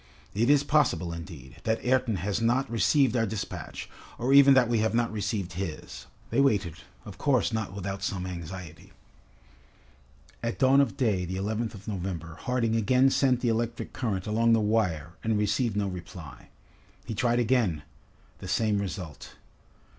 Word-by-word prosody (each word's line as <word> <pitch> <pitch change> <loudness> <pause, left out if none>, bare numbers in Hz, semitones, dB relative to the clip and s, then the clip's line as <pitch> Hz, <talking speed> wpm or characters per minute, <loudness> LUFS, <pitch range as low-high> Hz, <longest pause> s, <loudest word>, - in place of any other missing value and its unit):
"It 115 +5 +1
is 145 -1 +5
possible, 140 - +1
indeed, 80 -6 -9
that 110 +2 -1
Ayrton 125 -3 +2
has 100 +5 -2
not 120 +4 +2
received 130 +2 +3
our 115 -2 +2
despatch, 105 0 -6 0.3
or 125 +3 +1
even 140 -1 +8
that 125 -2 +5
we 115 -1 +1
have 110 +1 +1
not 120 -1 +1
received 100 -3 -3
his." 90 -3 -6 0.2
They 140 - +3
waited, 100 - +2 0.3
of 100 -1 -10
course 130 -5 +2
not 110 -5 -2
without 100 0 -4
some 95 -2 -2
anxiety. 85 -2 -8 1.5
At 115 - -3
dawn 135 +1 +5
of 120 -9 -1
day, 105 -7 +1
the 90 +2 -4
11th 110 +3 -2
of 100 0 -13
November, 90 -5 -4
Harding 120 +2 -1
again 130 +4 +3
sent 130 -3 +2
the 120 - +1
electric 115 +1 -2
current 100 -7 -2
along 115 +2 +2
the 115 - +4
wire 100 -8 0
and 110 -1 +1
received 105 +1 0
no 100 -1 0
reply. 90 -4 -9 0.6
He - - -4
tried 120 +2 +1
again: 115 - +1 0.6
the 95 - -8
same 105 +2 +1
result. 95 -6 -6
110 Hz, 160 wpm, -27 LUFS, 95-120 Hz, 1.5 s, even